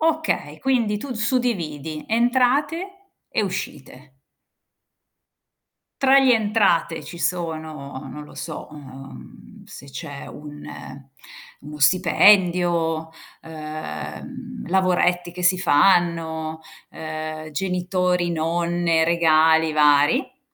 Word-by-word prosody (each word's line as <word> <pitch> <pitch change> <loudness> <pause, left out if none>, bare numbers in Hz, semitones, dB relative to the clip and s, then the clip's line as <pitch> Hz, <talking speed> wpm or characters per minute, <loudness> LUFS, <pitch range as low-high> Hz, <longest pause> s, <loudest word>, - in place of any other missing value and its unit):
Okay. 315 - -1
Quindi 235 -6 +1
tu 275 +6 -7
d - - -3
suddividi: 170 - -2
entrate 260 - +1 0.4
e - - 0
uscite. 135 -7 -7 1.8
Tra 270 0 +6
gli 265 -1 +4
entrate, 205 -7 +2
ci 175 - -9
sono, 160 -5 -4
non 150 0 -8
lo - - -15
so, - - -7
uhm, 135 - -12
se - - -12
c'è 140 +1 -8
un 150 0 -10
ehm, 135 0 -10 0.5
uno 150 +1 -10
stipendio, 175 -1 +3 0.3
ehm, 160 +10 -8
lavoretti 180 -1 +1
che 180 +1 -7
si 180 +1 +4
fanno, 165 -2 +2 0.3
ehm, 155 0 -6
genitori, 180 +1 0
nonne, 170 0 +1
regali 160 -1 +4
vari. 150 - +3
170 Hz, 95 wpm, -22 LUFS, 155-200 Hz, 1.8 s, Tra